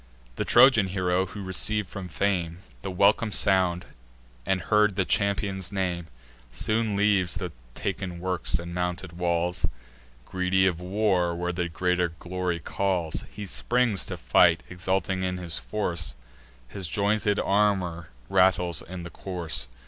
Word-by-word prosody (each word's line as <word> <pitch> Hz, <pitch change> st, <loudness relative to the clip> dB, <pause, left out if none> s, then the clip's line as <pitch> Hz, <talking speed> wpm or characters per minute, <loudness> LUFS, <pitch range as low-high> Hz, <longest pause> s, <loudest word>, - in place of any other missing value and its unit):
The -, -, -3 dB
Trojan 115 Hz, -7 st, +6 dB
hero, 90 Hz, 0 st, 0 dB
who 100 Hz, +2 st, -8 dB
receiv'd 100 Hz, +2 st, +1 dB
from 95 Hz, +1 st, -7 dB
fame 85 Hz, -1 st, -1 dB, 0.2 s
The 95 Hz, -, -4 dB
welcome 100 Hz, +4 st, +3 dB
sound, 95 Hz, -3 st, +2 dB, 0.6 s
and 95 Hz, -1 st, +2 dB
heard 105 Hz, +2 st, +3 dB
the 95 Hz, -, +1 dB
champion's 100 Hz, -2 st, 0 dB
name, 90 Hz, -4 st, -2 dB, 0.4 s
Soon 110 Hz, -, -1 dB
leaves 100 Hz, -4 st, +2 dB
the -, -, -4 dB, 0.2 s
taken 95 Hz, -2 st, -4 dB
works 90 Hz, -1 st, +1 dB
and 85 Hz, +1 st, -7 dB
mounted 90 Hz, 0 st, -3 dB
walls, 85 Hz, 0 st, 0 dB, 0.6 s
Greedy 95 Hz, 0 st, +1 dB
of 90 Hz, -3 st, +1 dB
war 90 Hz, -2 st, +1 dB
where 90 Hz, +1 st, -2 dB, 0.2 s
greater 90 Hz, +1 st, 0 dB
glory 90 Hz, -1 st, -3 dB
calls. 90 Hz, -1 st, -1 dB
He 105 Hz, -, -7 dB
springs 120 Hz, +1 st, 0 dB
to -, -, -5 dB
fight, 80 Hz, +7 st, +4 dB
exulting 95 Hz, +1 st, -1 dB
in 90 Hz, 0 st, -1 dB
his 90 Hz, -2 st, -3 dB
force 85 Hz, -10 st, -2 dB, 0.5 s
His 95 Hz, +7 st, -6 dB
jointed 105 Hz, +2 st, +1 dB
armour 95 Hz, -5 st, +1 dB, 0.2 s
rattles 90 Hz, -2 st, +3 dB
in 90 Hz, 0 st, -8 dB
the 85 Hz, -, -8 dB
course. 90 Hz, -8 st, -1 dB
95 Hz, 135 wpm, -26 LUFS, 85-100 Hz, 0.6 s, Trojan